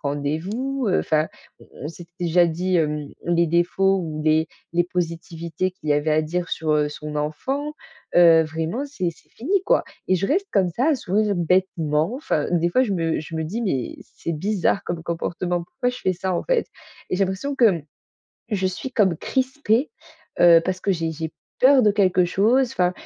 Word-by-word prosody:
rendez-vous, 175 - -2
heu, 185 - +2
enfin, 155 0 +1 0.3
on - - -17 0.2
on - - -4
s'est 170 +1 -10
déjà 175 0 +4
dit, 180 +3 0
hem, 150 -3 0 0.2
les 170 -1 +2
défauts 180 +4 +2
ou 155 -4 -4
les 155 +1 +3 0.3
les 175 0 +2
positivités 170 0 -3
qu'il 160 -4 -10
y 145 - +5
avait 150 +1 +1
à 155 +1 +3
dire 175 +3 -3
sur, 160 -1 -2
heu, 150 -1 +2
son 150 0 -7
enfant. 265 - -2 0.4
Heu, 165 -2 +7
vraiment, 160 - -3
c'est 185 -12 -2
c'est - - -21
fini, 375 - -1
quoi - - +3 0.2
et 185 - +3
je 185 +2 0
reste 385 +7 +1
comme 190 -3 +3
ça, 235 - -1
à - - +3
sourire 210 -3 0
bêtement. 170 -1 +1
Enfin, 265 - -1
des 170 0 +2
fois 255 +9 +3
je 205 - -2
me 165 -3 0
je 155 +2 -7
me 160 - -1
dis: 210 +10 -3
«Mais 135 - -2
c'est 170 - -6
bizarre 195 +4 0
comme 170 -2 -4
comportement, 170 +1 -2
pourquoi 245 +7 -2
je 250 - -8
fais 185 - 0
ça, 185 +1 -2
en - - -3
fait?» - - +1 0.4
Et - - 0
j'ai 195 - +3
l'impression 195 +10 -3
que, 250 - +4
mmh, 165 -3 -4 0.7
je 190 -2 +1
suis 220 +8 -6
comme 195 -9 +3
crispée, 260 - 0 0.5
heu, 170 -1 +8
parce 185 0 -2
que 195 - +1
j'ai 165 -2 -2
j'ai 160 0 -5 0.3
peur 265 0 +6
de 210 -2 +4
quelque 185 -3 +3
chose 230 +8 +2
enfin, 180 0 +1
175 Hz, 200 wpm, -23 LUFS, 160-210 Hz, 0.7 s, heu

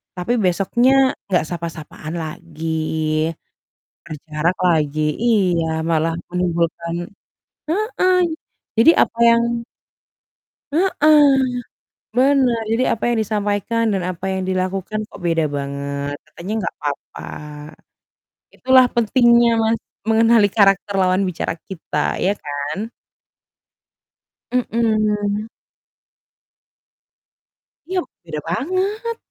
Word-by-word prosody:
Tapi 180 +7 -1
besoknya 200 +7 +2 0.4
nggak 180 -4 +2
sapa-sapaan 165 -2 -6
lagi, 160 0 -7 1.4
berjarak 155 +2 -2
lagi. 155 -2 +1 0.2
Iya, 185 -8 +2 0.2
malah 165 0 +1 0.2
menimbulkan 170 -1 -1 0.7
heeh. 370 -1 +1 0.6
Jadi 230 +8 +7
apa 230 - -2
yang 235 0 +2 1.1
Heeh. 300 -6 +4 0.7
Benar. 260 -3 +3
Jadi 240 +3 +2
apa 225 - -2
yang 240 -1 +1
disampaikan, 210 +2 -1
dan 190 -2 -1
apa 180 0 -4
yang 190 0 -2
dilakukan 185 +3 -2
kok - - -13
beda 165 -2 +2
banget. 140 0 -4
Katanya 175 +7 -7
nggak 175 - -3
apa-apa. 145 -1 -6 1.3
Itulah 260 0 +5
pentingnya 235 0 +4
Mas, 225 +1 +2 0.3
mengenali 225 -2 +5
karakter 195 0 +3
lawan 185 0 +2
bicara 165 - -3 0.2
kita, 160 -5 -2
ya 195 +2 +1
kan? 145 +9 -4 1.6
Mmm. 215 -3 0 2.4
Iya, 375 -1 +1 0.2
beda 155 -2 -5
banget. 380 - -2
200 Hz, 90 wpm, -20 LUFS, 170-235 Hz, 2.4 s, Jadi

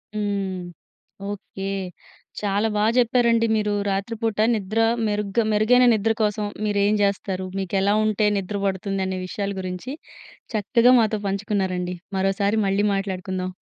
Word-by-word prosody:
హ్మ్. 200 -3 -2 0.7
ఓకే. 195 -1 -7 0.7
చాలా 205 +2 +1
బా 210 - +2
చెప్పారండి 235 -1 +3
మీరు. 210 -1 0 0.2
రాత్రిపూట 220 +2 -2 0.2
నిద్ర 215 +2 -2 0.3
మెరుగ్గా 210 +2 0
మెరుగైన 245 +4 +4
నిద్ర 220 +1 +1
కోసం 210 0 0 0.2
మీరేం 205 0 +2
చేస్తారు? 190 -1 -1
మీకెలా 195 +2 +1
ఉంటే 215 0 +2
నిద్ర 200 +1 -3
పడుతుందనే 190 -1 -2
విషయాల 200 +2 -3
గురించి 185 +8 -5 0.6
చక్కగా 235 +4 +4
మాతో 215 -1 0
పంచుకున్నారండి. 190 -3 -1 0.2
మరోసారి 200 +3 +1
మళ్ళీ 195 +2 +1
మాట్లాడుకుందాం. 185 -1 -3
200 Hz, 115 wpm, -23 LUFS, 195-215 Hz, 0.7 s, మెరుగైన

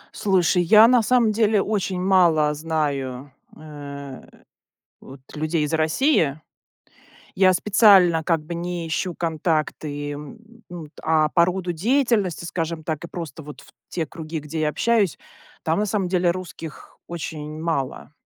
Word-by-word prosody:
Слушай, 180 -3 +2
я 215 +6 +7
на 245 -1 +4
самом 235 -1 +3
деле 215 -1 +2
очень 195 -3 -2
мало 170 -5 +3
знаю, 145 -4 -3 0.3
э, 140 -3 -9 0.8
вот 135 0 -13
людей 155 +1 -1
из 150 +2 -2
России. 160 - +1 0.9
Я 185 -1 +5
специально 190 -5 +5
как 165 0 +1
бы 170 - -6
не 175 0 -4
ищу 175 +3 -2
контакты, 155 -3 -2
м, 150 +9 -9 0.3
ну 170 -3 -8
т 150 - -22
а 155 -1 +2
по 170 0 +4
роду 180 0 -2
деятельности, 215 - 0
скажем 165 -2 -4
так, 155 -1 -4
и 170 - -7
просто 165 -3 -7
вот 145 -1 -11
в - - -19 0.2
те 165 -3 -3
круги, 160 +1 -6
где 150 +1 -5
я 155 - +1
общаюсь, 210 +2 +1 0.5
там 160 +5 +1
на 210 - 0
самом 195 -2 -1
деле 180 -1 +1
русских 170 -3 -8
очень 155 -2 -6
мало. 155 -3 -3
165 Hz, 150 wpm, -22 LUFS, 155-185 Hz, 0.9 s, я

